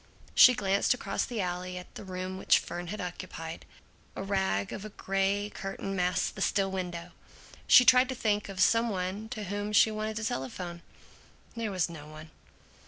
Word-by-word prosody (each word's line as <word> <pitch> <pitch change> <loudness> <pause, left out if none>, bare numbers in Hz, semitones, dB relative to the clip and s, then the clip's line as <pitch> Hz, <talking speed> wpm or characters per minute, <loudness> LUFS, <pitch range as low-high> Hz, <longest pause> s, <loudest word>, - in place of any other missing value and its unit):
She 250 - +8
glanced 200 +1 +2
across - - -2
the 235 -4 -3
alley 180 0 -3
at 180 - -10
the - - -8
room 185 0 -5
which - - +5
Fern 175 +1 -5
had 210 +5 -5
occupied. 170 -2 -7 0.5
A - - -4
rag 190 - 0
of 195 - -6
a 215 - -6
gray 195 +1 -1
curtain 195 0 -5
masked 180 -1 0
the - - -8
still 195 -1 +1
window. 175 -2 -4 0.6
She 250 0 +8
tried 255 +1 +6
to 260 - -2
think 210 -3 0
of 195 -1 -7
some 230 +4 +4
one 195 +2 -3
to 220 -3 -5
whom 205 +2 -3
she 215 +1 +5
wanted 215 0 -3
to 220 - -3
telephone. 170 - -4 0.7
There 230 -2 -2
was 185 -4 0
no 155 -3 -10
one. 155 +1 -11
195 Hz, 180 wpm, -29 LUFS, 180-210 Hz, 0.7 s, She